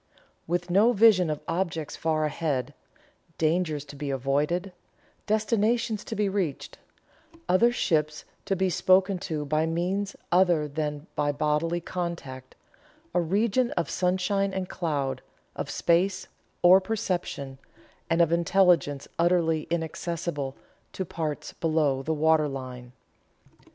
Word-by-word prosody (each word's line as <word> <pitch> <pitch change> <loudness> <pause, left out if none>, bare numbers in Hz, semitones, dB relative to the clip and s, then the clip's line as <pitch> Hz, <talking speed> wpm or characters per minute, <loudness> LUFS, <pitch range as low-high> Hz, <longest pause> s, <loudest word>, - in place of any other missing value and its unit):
With 175 +1 -2
no 215 +6 +5
vision 200 -6 +5
of 150 -1 -3
objects 165 -3 -2
far 155 -1 0
ahead 145 -4 -2 0.6
dangers 155 -2 0
to 145 - -11
be 145 0 -5
avoided 145 +8 -1 0.5
destinations 220 +1 +1
to - - -5
be 210 0 +1
reached 190 -8 -3 0.7
other 230 +7 +4
ships 155 -9 0 0.2
to 195 - 0
be 190 0 +1
spoken 185 +2 +3
to 155 -4 -3
by 155 +2 +1
means 185 +4 -1 0.2
other 175 -4 +3
than 150 0 -4
by 145 0 +1
bodily 155 +4 0
contact 170 -8 -5 0.6
a 175 - +3
region 215 +8 +1
of 170 - -2
sunshine 190 +2 0
and 190 -1 -2
cloud, 140 -6 -2 0.3
of - - -4
space, 180 +3 +1 0.4
or 185 +2 +8
perception, 180 -10 -3 0.5
and 170 +1 +4
of 165 - 0
intelligence 170 -5 +2
utterly 165 -2 +2
inaccessible 160 -3 -3 0.4
to 190 - -3
parts 155 -3 -4
below 155 -5 +1
the 155 - -3
waterline." 135 -6 0
170 Hz, 120 wpm, -27 LUFS, 150-185 Hz, 0.7 s, or